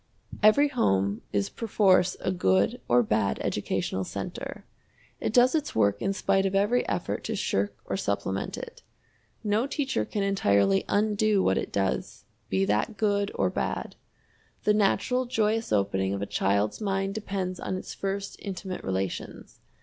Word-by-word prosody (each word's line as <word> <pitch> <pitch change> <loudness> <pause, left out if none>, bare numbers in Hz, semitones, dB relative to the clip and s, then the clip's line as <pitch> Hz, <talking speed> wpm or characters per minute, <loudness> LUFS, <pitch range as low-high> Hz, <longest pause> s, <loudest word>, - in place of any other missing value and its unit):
Every 280 +8 +6
home 100 - +1
is 100 -1 0
perforce 190 - +2
a - - 0
good 95 - +2
or 120 0 +4
bad 105 -2 +1
educational 95 - -1
center. - - -6 0.5
It - - -1
does 245 +2 +5
its 305 -2 -1
work 100 -2 +2
in 195 - +1
spite 195 0 +1
of 195 - -2
every 210 +5 +3
effort 90 -4 -2
to - - -2
shirk 100 +1 -1
or 100 - -2
supplement 95 0 -2
it. - - -9 0.6
No 215 +4 +1
teacher 275 - -1
can 200 - -2
entirely 100 - +2
undo 210 -1 +2
what 95 - +2
it - - -5
does, 95 -1 -2 0.2
be 95 0 +2
that 105 - 0
good 205 -1 +1
or - - +1
bad. - - -3 0.7
The 210 - +4
natural 215 +5 +2
joyous 225 -2 0
opening 100 -1 +1
of 100 - -5
a - - -1
child's 100 - 0
mind 195 -1 -1
depends 195 -3 -3
on 185 - -3
its - - -7
first 195 0 -4
intimate 190 -2 -6
relations. 95 -1 -4
190 Hz, 155 wpm, -27 LUFS, -, 0.7 s, Every